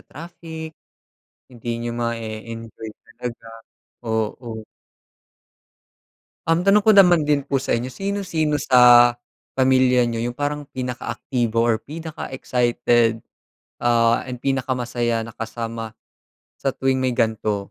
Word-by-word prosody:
traffic. 160 0 -9 0.8
Hindi 120 -2 -11
niyo 120 0 -3
mae-enjoy 115 -1 -5 0.2
talaga, 115 0 -8 0.6
oo. 110 +1 -3 1.9
Um, 165 +2 +2
tanong 200 +1 +5
ko 220 - +6
naman 175 -6 +6
din 145 -2 +2
po 135 -1 0
sa 120 - 0
inyo, 125 +2 -4
sino-sino 185 -7 -1
sa 120 -3 +7 0.4
pamilya 130 -2 +3
n'yo 115 0 -2
yung 120 - -2
parang 145 0 -2
pinakaaktibo 120 -2 -2
or 115 -1 +3
pinaka-excited, 120 -5 -1 0.6
ah, 115 -1 +2
and 125 -1 -7
pinakamasaya 120 -3 -1
na 115 +1 -9
kasama 115 0 -5 0.7
sa 135 - +1
tuwing 130 0 0
may 130 - +1
gan'to? 110 -3 0
120 Hz, 110 wpm, -22 LUFS, 115-140 Hz, 1.9 s, sa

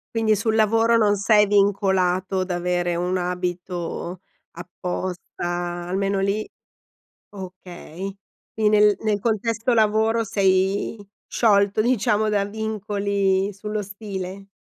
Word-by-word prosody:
Quindi, 220 -1 +3
sul 220 +2 0
lavoro 225 +1 +3
non 210 -2 +3
sei 210 +1 +4
vincolato 190 -2 +2
da 180 -1 -3
avere 175 0 -1
un 180 +2 -1
abito 180 0 -4 0.3
apposta, 175 0 -5
almeno 195 +1 0
lì 200 +2 -1 0.8
Okay. 185 0 -8 0.4
Quindi 215 -1 +2
nel 210 -1 +4
nel 215 -2 0
contesto 230 +2 0
lavoro, 220 +1 +2
sei 195 +1 +1 0.3
sciolto, 200 -2 +2
diciamo, 215 -3 +1
da 205 -1 +1
vincoli 200 -2 -1
sullo 210 +2 -4
stile? 195 -1 -7
200 Hz, 105 wpm, -23 LUFS, 185-215 Hz, 0.8 s, sei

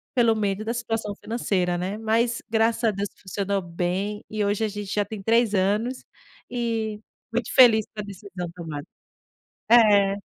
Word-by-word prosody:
pelo 235 -2 +4
medo 205 -1 -1
da 230 - -1
situação 225 -3 -3
financeira, 195 -6 -1
né. 185 +4 -3
Mas, 230 +2 +1
graças 225 +1 +2
a 225 - +4
Deus, 200 0 -3
funcionou 200 +1 -2
bem, 180 +4 -2
e 215 -1 -1
hoje 205 +2 0
a - - 0
gente 205 -1 -5
já 205 - +2
tem 205 -1 -7
3 225 -1 +3
anos, 210 +7 0 0.5
e 225 -3 -2 0.3
muito 240 -1 -1
feliz 230 -5 +7
pela 210 - -4
decisão 190 -3 -7
tomada. 155 -4 -6 0.9
É. 205 -4 +6
210 Hz, 155 wpm, -25 LUFS, 195-225 Hz, 0.9 s, feliz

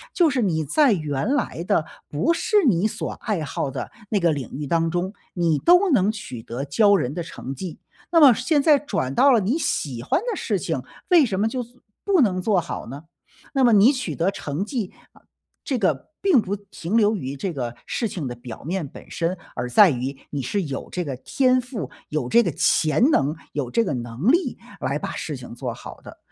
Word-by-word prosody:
就 335 -5 +4
是 255 - 0
你 160 -7 0
在 275 - +4
原 155 - -1
来 170 - -2
的， 165 -3 +1 0.2
不 215 - +1
是 415 +3 +2
你 200 -1 +3
所 - - -4
爱 205 -7 -3
好 140 0 -3
的 135 - -5 0.2
那 210 - +1
个 170 -3 +3
领 140 -5 -4
域 145 +2 -4
当 165 +3 +1
中， 175 +3 -2 0.2
你 165 -4 +1
都 355 +2 +5
能 210 -6 +3
取 130 - -8
得 120 +4 -5
骄 200 +8 +4
人 125 -5 -2
的 175 - -3
成 135 -5 -7
绩， 165 +4 -7 0.3
那 335 - +5
么 280 -5 +9
现 280 +5 +1
在 300 -2 +5
转 135 - -2
到 275 - +5
了 235 - +5
你 235 - 0
喜 130 - -2
欢 135 - +1
的 475 -1 -2
事 215 - -1
情， 160 -6 -2 0.3
为 350 -4 +7
什 200 -7 -1
么 215 - +2
就 255 +2 -2
做 245 +1 -13 0.2
不 395 -3 +3
能 185 -6 +2
做 200 -1 +2
好 170 - -5
呢？ 140 +5 -8 0.5
那 270 -2 +2
么 240 -2 +5
你 215 +7 +6
取 255 - -3
得 175 +4 +1
成 150 +4 -4
绩， 220 -5 -3 0.2
啊 - - -21 0.4
这 265 - -1
个， 160 - 0
并 360 - +4
不 200 0 -3
停 200 0 -4
留 215 -1 +4
于 140 -7 -4
这 185 +4 -3
个 120 -4 -4
事 230 - -1
情 170 -9 -5
的 120 - -4
表 120 -1 -10
面 175 +2 -2
本 - - -13
身， 170 +2 -1 0.2
而 125 0 -3
在 195 - +7
于 130 +1 -3
你 145 - -2
是 195 +10 -1
有 140 -4 -5
这 180 - -2
个 140 -5 -4
天 255 - +2
赋， 230 - -6 0.2
有 150 -5 -2
这 235 - +5
个 175 - 0
潜 160 - +3
能， 150 - +2 0.2
有 140 -4 -2
这 230 - +1
个 170 - -1
能 120 - 0
力， 345 +4 +1 0.2
来 - - -1
把 - - -4
事 - - -5
情 - - -10
做 - - -4
好 - - -11
的。 - - -12
185 Hz, 235 characters per minute, -23 LUFS, -, 0.5 s, 么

